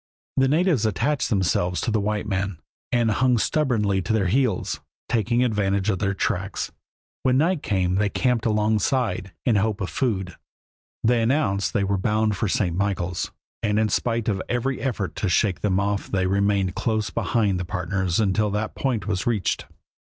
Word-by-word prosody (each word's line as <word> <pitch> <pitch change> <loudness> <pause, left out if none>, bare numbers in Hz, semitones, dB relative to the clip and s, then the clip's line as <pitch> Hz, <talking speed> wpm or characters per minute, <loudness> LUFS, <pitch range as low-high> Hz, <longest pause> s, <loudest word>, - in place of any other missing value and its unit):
The 135 0 +3
natives 155 - +2
attached 130 +7 0
themselves 90 -4 +1
to 115 - -1
the 110 -1 +1
white 105 +1 -1
men 95 -2 -2 0.3
and 120 -2 +2
hung 125 +3 +3
stubbornly 110 -8 +1
to 95 +5 -1
their 105 -3 +2
heels, 115 0 +1 0.3
taking 120 +2 +1
advantage 100 -3 +1
of 95 - -2
their 100 -1 0
tracks. 95 0 -2 0.5
When 130 0 +3
night 165 +2 +2
came 90 -3 0
they 100 +2 +2
camped 120 0 +1
alongside, 105 -1 +1
in 120 - +3
the 100 - +3
hope 110 -1 -1
of 95 - -3
food. 95 -9 -1 0.7
They 115 +1 +3
announced 115 -6 +1
that - - +2
they - - +1
were 100 0 0
bound 110 +1 +1
for 110 - -1
St. 95 -6 0
Michaels, 95 -2 -1 0.3
and 105 -1 +1
in 110 0 +2
spite 115 -1 0
of 100 -4 0
every 125 +2 -1
effort 110 -8 -2
to 100 - 0
shake 95 +1 +1
them 95 -2 +1
off 100 0 -1
they 95 -2 0
remained 100 -1 +1
close 110 -4 -1
behind 100 -2 +1
the - - -2
partners 90 +1 -1
until 105 0 +2
that 105 +2 -2
point 125 -7 -1
was 100 -1 -2
reached. 110 -6 0
105 Hz, 180 wpm, -24 LUFS, 95-115 Hz, 0.7 s, The